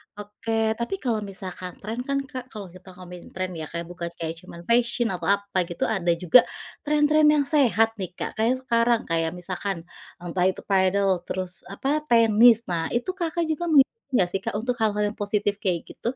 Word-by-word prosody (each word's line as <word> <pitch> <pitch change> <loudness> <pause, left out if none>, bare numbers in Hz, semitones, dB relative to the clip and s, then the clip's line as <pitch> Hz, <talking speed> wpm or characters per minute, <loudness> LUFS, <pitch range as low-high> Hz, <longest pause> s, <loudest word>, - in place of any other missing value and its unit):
Oke 220 +2 -2
tapi 235 +12 -2
kalau 230 -4 0
misalkan 190 -3 -7
tren 225 +4 -4
kan, 275 0 0
Kak 260 -2 -8
kalau 200 -7 -9
kita 185 0 -14
ngomongin 180 -1 -11
tren 185 0 -3
ya, 160 -3 -6
Kak 170 0 -5
bukan 175 0 -6
kayak 165 -1 -4
cuman 170 -2 -12
fashion 235 +1 +1
atau 180 - -4
apa 200 -1 -7
gitu 175 - -4
ada 195 -6 -1
juga 180 +8 +6 0.5
tren-tren 300 0 +4
yang 290 - +3
sehat 260 -6 +3
nih, 180 -1 -5
Kak. - - -4
Kayak 230 +3 +3
sekarang, 235 -1 +2
kayak 165 +1 0
misalkan 180 0 -4 0.4
entah 180 +1 0
itu 190 - -2
padel, 190 -1 +2
terus 185 -1 -3 0.2
apa? 275 +10 -1
Tenis. 230 -1 +6
Nah, 165 -1 -1
itu 240 +10 0
Kakak 340 0 -1
juga 345 +3 -2
ngikutin 310 - +3
enggak 180 - +4
sih, 195 - -1
Kak - - -4
untuk 240 +3 -2
hal-hal 210 -1 +1
yang - - -15
positif 205 0 -1
kayak 180 -5 -1
gitu? 240 +3 -4
205 Hz, 190 wpm, -25 LUFS, 180-240 Hz, 0.5 s, juga